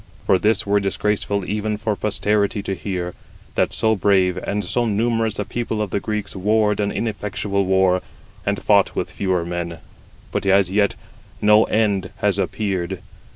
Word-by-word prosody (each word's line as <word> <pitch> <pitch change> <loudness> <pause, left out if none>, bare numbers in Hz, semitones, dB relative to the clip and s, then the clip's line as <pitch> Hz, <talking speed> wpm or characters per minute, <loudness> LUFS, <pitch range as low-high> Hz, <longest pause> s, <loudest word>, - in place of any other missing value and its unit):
For 95 - +4
this 110 +2 +2
were 100 0 +3
disgraceful 100 0 -1
even 105 +1 -2
for 105 0 -1
posterity 105 +1 0
to 95 - -2
hear, 90 -1 -4 0.4
that - - +1
so 110 0 +2
brave 95 -2 +3
and 100 +2 -2
so 120 -1 0
numerous 115 0 0
a 105 - -2
people 115 -2 -3
of 105 -3 -2
the - - 0
Greeks 105 -1 -4
warred 105 +2 +2
an 100 -1 0
ineffectual 100 -2 -2
war, 95 -1 +3 0.4
and - - -1
fought - - +3
with - - -2
fewer 90 -3 -1
men; 85 -1 -4 0.5
but - - -2
as 95 -1 +4
yet 100 0 +2 0.4
no 105 +1 +5
end 100 -4 +1
has 100 -1 +1
appeared. 95 -2 -2
100 Hz, 160 wpm, -21 LUFS, 95-105 Hz, 0.5 s, no